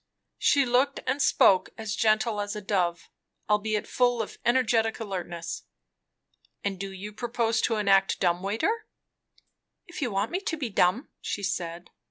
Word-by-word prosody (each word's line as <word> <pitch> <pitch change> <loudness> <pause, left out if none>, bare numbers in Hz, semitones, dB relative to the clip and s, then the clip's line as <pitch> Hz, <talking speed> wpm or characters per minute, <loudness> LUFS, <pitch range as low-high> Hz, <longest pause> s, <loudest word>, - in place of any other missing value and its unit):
She 280 -2 +4
looked 255 +3 +2
and 270 +3 0
spoke 190 -7 +4
as 220 -2 -3
gentle 215 -1 +2
as 205 +1 -4
a - - -3
dove, 180 -4 -1 0.4
albeit 210 0 +1
full 245 -1 +2
of - - -10
energetic 235 -2 +2
alertness. 175 -5 -5 1.0
"And 195 -2 -2
do 195 0 -4
you 200 +2 -8
propose 230 0 0
to 230 - +1
enact 195 -2 +3
dumb 175 -1 +1
waiter?" 225 - -1 1.0
"If 350 -2 -9
you 255 - 0
want 200 +1 -1
me 365 - 0
to 355 -4 -3
be 265 -6 -3
dumb," 195 +7 +2
she 205 - -4
said. 175 -2 -3
215 Hz, 155 wpm, -27 LUFS, 195-245 Hz, 1.0 s, She